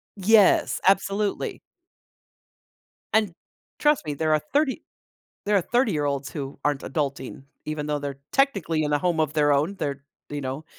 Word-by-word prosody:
Yes, 205 +1 +4
absolutely. 195 +1 +1 1.5
And 215 -5 +2 0.5
trust 295 - +2
me, 150 - -2
there 155 +2 0
are 155 - +2
30 285 -2 +1 0.6
there 205 0 +2
are - - +2
30 240 +5 +1
year 150 -2 0
olds 140 -1 -2
who 140 -3 -6
aren't 145 -2 0
adulting, 135 -2 -4 0.2
even 155 -1 -3
though 150 -1 -1
they're 140 -1 -6
technically 195 - +1
in 150 0 -1
a - - +4
home 175 -3 0
of 155 -2 0
their 150 -2 +3
own. 155 +8 0
They're, 140 -1 -3 0.3
you 145 0 -4
know, 135 +4 -5
155 Hz, 160 wpm, -25 LUFS, 145-200 Hz, 1.5 s, Yes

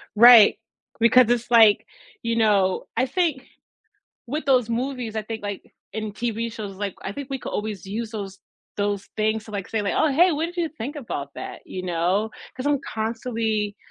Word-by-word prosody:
Right, 235 -1 +9 0.4
because 235 +1 +6
it's 240 0 0
like 225 -3 +6 0.4
you 230 0 -1
know, 205 -4 +2
I - - +2
think 330 -7 0 0.8
with 295 +6 -3
those 250 -4 +3
movies, 240 -2 -3
I 215 - -1
think 220 0 -6
like, 205 -1 -4 0.3
in 215 -1 -4
TV 230 +1 -3
shows, 205 -4 -7
like, 200 -1 -3
I - - -4
think 280 +3 -7
we 270 - -2
could - - -7
always 210 -3 -4
use 220 +3 -4
those 200 -3 -6 0.4
those 205 -1 -2
things 215 0 0
to 220 - -12
like 200 -2 -4
say 220 -2 -1
like, 200 - -1
"Oh, 305 - +3
hey, 345 +5 +5
what 310 +2 -1
did 350 +1 -10
you 340 -2 0
think 280 +5 -5
about 225 - -5
that?" - - -7
You 185 0 -6
know, 180 +5 0 0.3
cause 260 +2 -4
I'm 290 -1 +2 0.2
constantly 220 -2 -2
225 Hz, 190 wpm, -24 LUFS, 205-250 Hz, 0.8 s, Right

